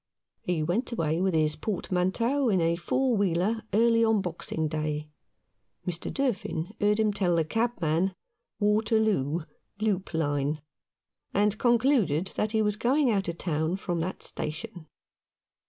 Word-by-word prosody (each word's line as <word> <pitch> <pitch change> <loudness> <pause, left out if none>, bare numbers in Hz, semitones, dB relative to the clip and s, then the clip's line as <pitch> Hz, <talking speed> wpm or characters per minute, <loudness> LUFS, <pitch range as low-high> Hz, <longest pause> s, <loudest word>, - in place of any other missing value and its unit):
He 175 -3 -1
went 190 +12 -1
away 165 -6 0
with 190 -3 +1
his 155 -1 +2
portmanteau 215 - 0
in 190 -4 +3
a 165 0 +2
four 255 +8 +1
wheeler 200 +3 +1
early 230 +1 +4
on 225 -1 +3
Boxing 165 -3 -3
Day. 150 0 -3 0.7
Mr. 175 -1 -3
Durfin 210 - -2
heard 210 +1 +3
him 215 -1 +2
tell 185 -4 +1
the 165 -1 +2
cabman, 185 -4 0 0.2
" - - -57
Waterloo 210 - +2 0.2
— 200 - -42
loop 195 -5 -1
line," 145 -1 0 0.8
and 210 +1 +3
concluded 235 - +2
that 210 - -1
he 220 -1 +2
was 210 0 0
going 255 +3 +2
out 195 -3 0
of 170 0 -3
town 160 0 -1
from 175 -3 -3
that 180 +3 -3
station. 165 +2 -4
190 Hz, 145 wpm, -28 LUFS, 165-220 Hz, 0.8 s, early